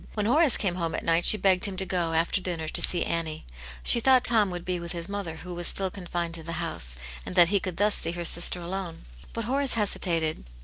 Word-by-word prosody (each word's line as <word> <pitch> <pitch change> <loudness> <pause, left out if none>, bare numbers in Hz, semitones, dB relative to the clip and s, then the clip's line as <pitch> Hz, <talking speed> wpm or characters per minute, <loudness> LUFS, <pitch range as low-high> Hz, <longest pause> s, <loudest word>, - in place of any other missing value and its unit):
When 210 -1 -1
Horace 285 +3 +4
came 190 -4 -1
home 165 -2 -3
at - - -5
night 165 +1 +1
she 215 - +10
begged 190 -1 +2
him 195 -2 -4
to 190 - 0
go, 175 -2 -2
after 165 +4 0
dinner, 170 -4 -5
to - - -1
see 175 - 0
Annie. 160 -2 -4 0.4
She - - +4
thought 255 +1 +3
Tom 220 -5 +3
would 175 -1 -6
be 180 -1 -2
with 170 -1 -5
his 170 0 -5
mother, 200 -5 -5
who 180 +2 -9
was 175 0 -1
still 190 -1 +2
confined 175 -3 -5
to 165 - -1
the 165 +1 -7
house, 160 - -1 0.3
and - - -8
that 175 -2 +6
he 200 0 +2
could 185 -2 -6
thus 205 +1 +2
see 165 - -2
her 175 0 -5
sister 170 +1 +3
alone. 175 0 -6 0.3
But 230 - -5
Horace 270 +2 +1
hesitated. 170 -7 0
180 Hz, 245 wpm, -26 LUFS, 170-200 Hz, 0.4 s, she